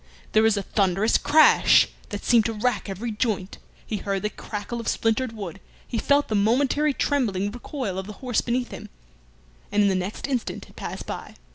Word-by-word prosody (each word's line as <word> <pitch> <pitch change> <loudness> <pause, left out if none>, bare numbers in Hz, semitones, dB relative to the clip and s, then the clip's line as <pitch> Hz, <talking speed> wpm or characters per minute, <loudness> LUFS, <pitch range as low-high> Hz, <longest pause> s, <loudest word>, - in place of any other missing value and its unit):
There 215 - +5
was 220 -1 +3
a 200 - -1
thunderous 195 +2 +2
crash 310 +1 +6 0.2
that 205 - -5
seemed 235 -3 +5
to 225 - -1
rack 220 0 -1
every 215 +5 -4
joint, 210 -3 -2 0.3
he 215 - -3
heard 195 0 -2
the 210 - -1
crackle 215 +3 -6
of 230 - -6
splintered 225 +2 +1
wood, 195 -4 -7 0.3
he 230 - -2
felt 285 +3 +3
the - - -3
momentary 265 +8 +2
trembling 210 -9 0
recoil 245 -4 -4
of 190 - -6
the 210 - -7
horse 245 +2 -1
beneath 245 +1 -2
him, - - -8 0.8
and 205 0 +3
in 200 - +4
the - - +2
next 185 +2 -3
instant 255 -4 -3
had - - -20
passed - - -6
by. - - -7
220 Hz, 190 wpm, -24 LUFS, 200-245 Hz, 0.8 s, crash